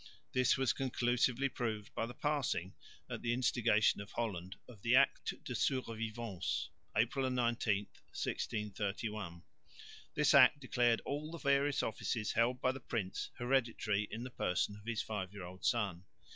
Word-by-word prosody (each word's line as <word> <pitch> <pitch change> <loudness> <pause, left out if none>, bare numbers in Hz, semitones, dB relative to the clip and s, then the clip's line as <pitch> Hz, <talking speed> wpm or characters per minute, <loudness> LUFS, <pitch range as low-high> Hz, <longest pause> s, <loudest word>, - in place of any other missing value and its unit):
This 130 -1 +3
was 130 -1 +2
conclusively 125 0 +1
proved 110 -5 -3
by 115 - -1
the 125 - -9
passing, 140 - -1 0.3
at - - -5
the 120 0 0
instigation 115 -5 +3
of 100 - -10
Holland, 95 -5 -3
of 115 -5 -13
the 120 +3 +4
Acte 140 +1 +3
de - - -4
Survivance 115 -6 -2 0.3
(April 130 +4 +2
19,1631). 105 -4 -2 0.7
This 150 0 +4
Act 140 +1 +8
declared 120 -3 +2
all 145 +2 -3
the 170 - -6
various 140 -1 +2
offices 110 0 -1
held 120 +2 +2
by 130 - +2
the 135 - -7
prince 105 -6 -3
hereditary 120 -5 +1
in 115 - -5
the 125 - -6
person 95 -1 0
of 105 0 -14
his 115 -3 -1
five 95 -4 -4
year 100 -3 -7
old 90 +1 -10
son. 100 -7 +1
115 Hz, 145 wpm, -35 LUFS, 105-130 Hz, 0.7 s, Act